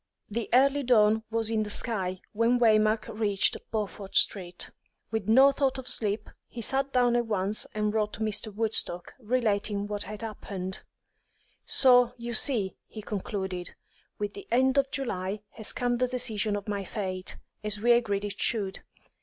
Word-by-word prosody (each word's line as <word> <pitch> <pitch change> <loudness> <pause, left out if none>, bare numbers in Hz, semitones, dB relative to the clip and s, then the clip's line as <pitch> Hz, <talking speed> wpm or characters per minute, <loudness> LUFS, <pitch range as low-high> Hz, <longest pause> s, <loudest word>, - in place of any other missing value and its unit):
The 230 +1 -3
early 275 +3 +4
dawn 220 -4 +4
was 225 0 -1
in 220 -1 +1
the 210 - -3
sky 190 -5 0
when 230 +3 +2
Waymark 215 -1 +3
reached 210 -3 +1
Beaufort 205 -2 -4
Street. 180 -3 +2 0.4
With 220 -3 -2
no 265 +5 +7
thought 275 -1 0
of 260 - -7
sleep, 210 -1 0 0.2
he 240 - -9
sat 270 +4 0
down 245 -2 +3
at 240 -1 +1
once 205 0 0
and 210 0 0
wrote 210 -1 0
to - - -8
Mr. 215 0 -1
Woodstock, 210 -5 +1
relating 210 -4 0
what 205 0 -3
had 210 +2 -7
happened. 190 -4 -5 0.8
"So, 245 -2 +5
you 235 0 -5
see," 220 -5 +1
he 215 - -9
concluded, 190 -4 -4 0.4
"with 205 -1 -3
the 400 - -10
end 260 +3 +3
of 275 -1 0
July 200 -7 -3
has 220 - -2
come 245 -1 -1
the 255 +1 +1
decision 220 -4 0
of 205 0 -6
my 200 -1 -2
fate, 185 -2 -4 0.3
as 210 -1 0
we 240 +3 +3
agreed 205 -4 +2
it 205 0 -6
should. 200 -4 0
215 Hz, 165 wpm, -28 LUFS, 205-240 Hz, 0.8 s, no